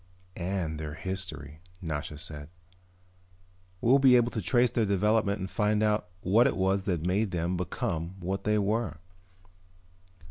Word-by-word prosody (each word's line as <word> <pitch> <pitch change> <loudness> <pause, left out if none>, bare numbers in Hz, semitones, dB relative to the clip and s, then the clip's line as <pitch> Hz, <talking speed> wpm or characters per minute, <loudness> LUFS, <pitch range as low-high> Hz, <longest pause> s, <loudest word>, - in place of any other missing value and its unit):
"And 85 -4 -3
their 75 -1 -5
history," 90 -5 -6 0.2
Nasha 75 -4 -4
said. 75 -1 -8 1.3
"We'll 130 +4 +5
be 130 -2 +6
able 120 0 +3
to 110 - -3
trace 120 +5 +3
their 115 - +1
development 100 +1 +2
and 95 - -2
find 105 +2 +1
out 105 -3 +1
what 110 +7 +4
it - - -1
was 95 0 +1
that 85 -5 -1
made 100 +4 +1
them 85 0 -1
become 85 0 -3
what 95 +2 -3
they 105 0 +2
were." 105 -3 0
95 Hz, 145 wpm, -29 LUFS, 85-105 Hz, 1.3 s, be